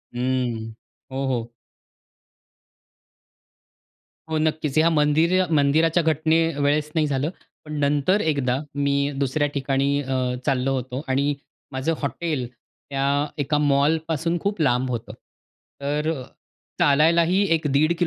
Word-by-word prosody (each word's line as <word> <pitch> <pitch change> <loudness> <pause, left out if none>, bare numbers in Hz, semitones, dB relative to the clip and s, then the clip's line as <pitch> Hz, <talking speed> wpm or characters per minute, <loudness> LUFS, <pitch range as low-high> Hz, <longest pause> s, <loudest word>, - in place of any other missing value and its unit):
हं. 120 -3 -1 0.4
हो, 135 +1 -2
हो. 120 -2 -2 2.8
हो 160 - 0
नक्कीच. 155 -2 -1
ह्या 160 +2 +5
मंदिर 160 +4 +3
मंदिराच्या 160 +3 +3
घटनेवेळेस 155 -1 +1
नाही 155 -2 +2
झालं. 140 +1 -1 0.4
पण 150 - -7
नंतर 145 +8 +2
एकदा 140 -5 0 0.2
मी 140 0 +1
दुसऱ्या 145 +2 +1
ठिकाणी 140 +1 0
अ, 130 -2 -1
चाललो 135 -1 +1
होतो 130 +1 -4
आणि 140 +2 +1 0.4
माझं 130 +5 -1
हॉटेल 140 -3 -2 0.4
त्या 140 +1 +1
एका 145 +1 0
मॉलपासून 155 +3 +1
खूप 200 -4 -1
लांब 125 -2 +2
होतं. 110 -3 -5 0.7
तर 150 +3 -1 0.7
चालायलाही 165 +6 +4
1 160 -1 -2
दीड 155 +4 +3
145 Hz, 110 wpm, -23 LUFS, 135-155 Hz, 2.8 s, ह्या